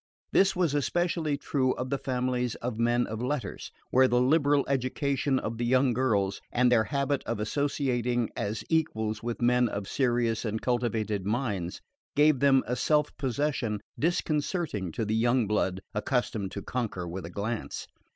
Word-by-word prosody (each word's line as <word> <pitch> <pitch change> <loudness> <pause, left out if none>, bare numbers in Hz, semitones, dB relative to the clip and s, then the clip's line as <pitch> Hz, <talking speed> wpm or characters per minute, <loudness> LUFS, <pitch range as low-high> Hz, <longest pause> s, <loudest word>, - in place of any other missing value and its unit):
This 195 0 +4
was 175 -5 +1
especially 160 0 0
true 130 -2 0
of 125 +1 -4
the 140 - 0
families 125 -2 -1
of 120 -2 -4
men 120 +1 +2
of 110 +1 -5
letters, 130 +2 -3 0.2
where 130 +1 +6
the 125 -1 +2
liberal 145 +1 +3
education 135 +1 0
of 115 -2 -3
the 120 - 0
young 130 0 +3
girls, 105 -6 +1
and 125 0 +3
their 110 -3 +4
habit 140 -1 -1
of 115 - -2
associating 120 -1 0
as 105 +2 -3
equals 110 -10 0
with 120 0 -3
men 125 0 +4
of 100 -1 -4
serious 120 -3 +1
and 110 -1 -2
cultivated 110 -5 -1
minds, 105 -7 -2 0.3
gave 150 -2 +5
them 135 -1 +5
a 125 - -1
self 150 +3 +1
possession 130 -5 -1 0.2
disconcerting 155 - -1
to 110 - -2
the 105 - -1
young 120 +1 +3
blood 95 -2 0
accustomed 105 -2 -1
to 100 - -5
conquer 110 -8 -3
with 90 +2 -5
a 85 - -6
glance. 105 +5 -4
125 Hz, 160 wpm, -28 LUFS, 110-140 Hz, 0.3 s, where